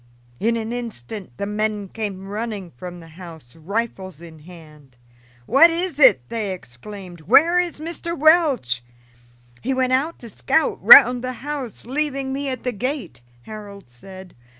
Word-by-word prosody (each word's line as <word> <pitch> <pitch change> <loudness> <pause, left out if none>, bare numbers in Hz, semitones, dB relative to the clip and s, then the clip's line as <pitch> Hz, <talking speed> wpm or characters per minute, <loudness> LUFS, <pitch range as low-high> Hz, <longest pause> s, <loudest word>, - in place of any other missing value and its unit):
In 230 +2 +1
an 225 +1 -4
instant 215 - -7
the 200 - -3
men 210 0 -2
came 195 -2 -6
running 205 -3 -5
from 175 +8 -9
the 165 - -14
house, 160 -6 -13
rifles 190 0 -4
in 165 -2 -13
hand. 150 -5 -16 0.5
"What 300 - +6
is 335 -1 -3
it?" 130 - +5
they 215 -4 -3
exclaimed. 180 - -11
"Where 310 - +4
is 350 -4 -2
Mr. 335 +1 -4
Welch?" 285 - +3 0.8
"He 265 +2 -1
went 255 0 +1
out 295 +6 0
to 235 - -12
scout - - 0
round 250 0 +9
the 255 0 -3
house, 285 -6 -6
leaving 275 0 -2
me 280 0 -3
at 255 - -5
the 250 - -1
gate," 230 - -5 0.2
Harold 200 - -11
said. 185 +8 -13
215 Hz, 150 wpm, -21 LUFS, 175-265 Hz, 0.8 s, round